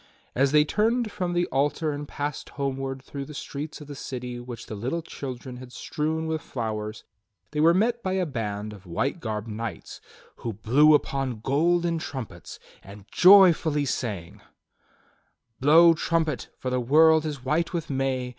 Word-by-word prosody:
As 135 +1 +2
they 150 0 +5
turned 225 +5 +1
from 180 -4 -2
the 175 0 +2
altar 145 +3 0
and 145 0 -5
passed 145 0 -4
homeward 135 -1 -3
through 140 0 -6
the 150 - -10
streets 150 +3 -6
of 150 - -10
the 145 - -7
city 125 -3 -6
which 120 -1 -8
the - - -8
little 130 +11 -3
children 130 -3 -7
had 125 0 -11
strewn 160 +4 -3
with 160 -1 -2
flowers 110 -4 -4 0.5
they 150 - -3
were 165 +3 +5
met 235 +4 +1
by 185 -3 -2
a 190 -1 +1
band 105 -6 -4
of 100 -2 -14
white 130 - -1
garbed 110 -4 -4
knights 110 +1 -6 0.4
who 115 - -4
blew 135 +9 +5
upon 135 -5 -2
golden 170 +6 +1
trumpets 120 - -7 0.2
and 100 0 -13
joyfully 175 -6 +6
sang: 105 -10 -4 1.2
"'Blow 165 +5 +7
trumpet, 160 -3 -1
for 130 - -4
the 125 - +1
world 160 +5 +5
is 145 -5 -5
white 160 +5 +1
with 170 -5 -3
May! 130 -2 -1
140 Hz, 165 wpm, -26 LUFS, 120-160 Hz, 1.2 s, Blow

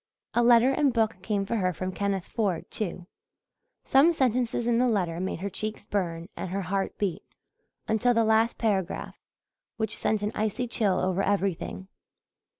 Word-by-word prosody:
A 240 - +3
letter 240 +2 +6
and 280 0 +2
book 225 -4 +1
came 200 0 -1
for 230 +3 -1
her 185 -3 +1
from 185 +3 -4
Kenneth 195 -1 -2
Ford, 195 -7 -1
too; 180 -4 -3 0.8
some 280 +6 +5
sentences 245 -4 +1
in 235 -1 +2
the 250 - +3
letter 180 -7 0
made 185 -2 -3
her 200 - -2
cheeks 215 +2 -5
burn 170 -5 -2
and 190 - -5
her 195 +2 -2
heart 195 +2 -2
beat 195 -5 -1 0.7
until 220 +3 +2
the 230 - +4
last 220 +1 +3
paragraph, 195 -5 -1 0.6
which 220 -1 -1
sent 215 -1 0
an 210 - 0
icy 220 +4 -1
chill 205 -5 +1
over 185 +1 0
everything. 195 -1 -1
210 Hz, 165 wpm, -27 LUFS, 190-230 Hz, 0.8 s, letter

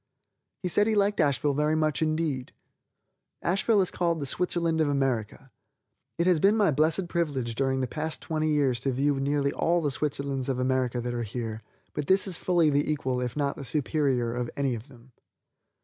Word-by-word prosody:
He - - 0
said 205 +4 +3
he 220 - +2
liked 205 0 +2
Asheville 145 -2 +2
very 150 +2 +1
much 155 -1 0
indeed. 155 -5 -1 0.9
Asheville 195 +4 +2
is 185 - -1
called 170 -2 0
the 140 - -3
Switzerland 165 +2 0
of 155 - +2
America. 135 -2 -1 0.7
It 170 - +1
has 180 -3 +4
been 200 +6 +4
my 205 -6 +4
blessed 155 +5 +1
privilege 145 -9 -1
during 130 +2 0
the 130 - -1
past 155 +5 -4
twenty 155 -1 -1
years 140 -5 +2
to 135 +2 -1
view 140 +2 +1
nearly 140 0 +1
all 175 +1 +1
the 150 -4 -1
Switzerlands 140 -1 -2
of 130 - 0
America 130 -1 0
that 120 0 -3
are 120 - -2
here, 115 0 -4 0.3
but 145 -2 -4
this 190 +1 +4
is 185 -4 -2
fully 170 -4 +3
the 145 +2 +1
equal 130 -4 -1
if 125 +2 -3
not 140 -1 0
the 140 - -6
superior 135 -4 0
of 120 0 -3
any 140 -2 +1
of 115 +2 -7
them. 130 -2 -18
145 Hz, 195 wpm, -27 LUFS, 130-165 Hz, 0.9 s, has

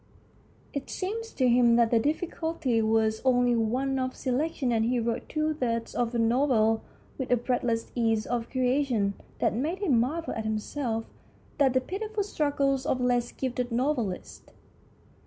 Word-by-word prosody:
It 280 -1 -4
seemed 430 +5 -3
to 260 - 0
him 240 -1 +5
that 235 -1 +3
the 230 - +5
difficulty 310 -3 -1
was 220 0 +2
only 245 -2 +3
one 255 +4 0
of 255 0 -2
selection, 265 0 -1
and 225 -1 +2
he 245 +2 +1
wrote 230 0 -2
two 310 0 0
thirds 230 -5 -2
of 240 0 -1
a - - +2
novel 230 -2 +3 0.4
with 260 - -3
a 245 - +5
breathless 240 -1 -1
ease 225 -3 +1
of 235 -1 -2
creation 255 -5 +1 0.2
that - - +1
made 300 - -1
him 325 - +2
marvel 315 +8 -1
at 220 - -3
himself 225 +2 -2 0.5
and 275 -2 +5
the 260 - +4
pitiful 425 +6 -3
struggles 280 -7 0
of 255 - +1
less 245 -1 +1
gifted 250 -1 -3
novelists. 240 -6 -2
250 Hz, 155 wpm, -28 LUFS, 230-280 Hz, 0.5 s, him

